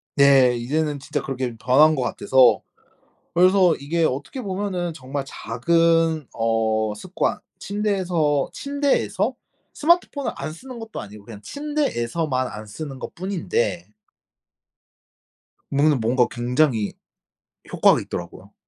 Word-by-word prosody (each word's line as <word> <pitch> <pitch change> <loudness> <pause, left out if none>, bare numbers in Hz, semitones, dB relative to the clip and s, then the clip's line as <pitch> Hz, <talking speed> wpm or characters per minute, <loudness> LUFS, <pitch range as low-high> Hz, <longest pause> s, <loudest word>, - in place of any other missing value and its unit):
네. 135 -3 +6
이제는 145 +4 -1
진짜 145 +2 -3
그렇게 130 -3 -4
변한 145 +7 +5
것 135 - -2
같아서. 130 0 +3 0.7
그래서 180 0 +5
이게 160 +4 -1
어떻게 145 - -2
보면은 190 -4 -3
정말 135 -1 -5
작은 165 +5 +1
어 110 -1 0
습관 185 - -2 0.2
침대에서, 185 -8 0
침대에서 285 0 0 0.4
스마트폰을 310 -3 +1
안 155 - -5
쓰는 250 +9 -10
것도 225 -1 -7
아니고 105 0 -11
그냥 105 -2 -10
침대에서만 160 - -2
안 110 -1 -8
쓰는 135 +5 -7
것뿐인데 130 - -2 1.8
문가 145 +2 +3
뭔가 120 +2 +2
굉장히 120 -2 +1 0.8
효과가 - - +4
있더라고요. 90 +3 -7
145 Hz, 265 characters per minute, -23 LUFS, 120-180 Hz, 1.8 s, 네